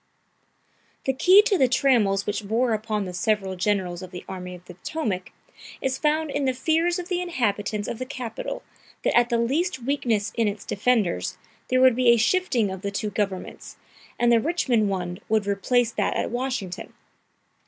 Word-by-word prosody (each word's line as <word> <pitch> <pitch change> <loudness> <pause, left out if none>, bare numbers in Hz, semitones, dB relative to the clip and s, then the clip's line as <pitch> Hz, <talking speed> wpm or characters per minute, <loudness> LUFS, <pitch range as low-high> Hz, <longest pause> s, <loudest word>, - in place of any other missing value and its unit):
The 265 - +2
key 370 +9 +6
to 415 -5 +1
the 260 - +5
trammels 225 -7 +2
which 205 0 -3
bore 230 +2 +1
upon 215 -1 -2
the 180 - -6
several 195 0 0
generals 185 -2 -1
of 185 - -8
the 180 -1 -9
Army 180 -1 -6
of 180 0 -15
the 180 - -10
Potomac 185 - -4 0.5
is 265 0 -2
found 310 0 +1
in 285 -1 -1
the 260 -1 +1
fears 325 +6 +1
of 355 -1 -5
the 360 -1 -1
inhabitants 215 - -1
of 225 - -4
the 255 - -3
capital 250 -5 -5 0.4
that - - +1
at 240 0 +4
the 235 - +2
least 265 +4 0
weakness 235 -6 0
in 230 -2 +2
its 205 0 -4
defenders, 205 - 0 0.3
there 255 0 +2
would 260 -2 +6
be 250 0 +1
a 235 - +7
shifting 235 - +2
of 190 -1 -6
the 200 - -2
two 205 +1 -3
governments, 195 -2 -4 0.4
and 240 0 +3
the 235 - +6
Richmond 245 -8 +1
one 180 -2 -3
would 215 -2 +2
replace 230 +4 +1
that - - -1
at - - -1
Washington. 245 -7 -4
230 Hz, 185 wpm, -25 LUFS, 200-265 Hz, 0.5 s, a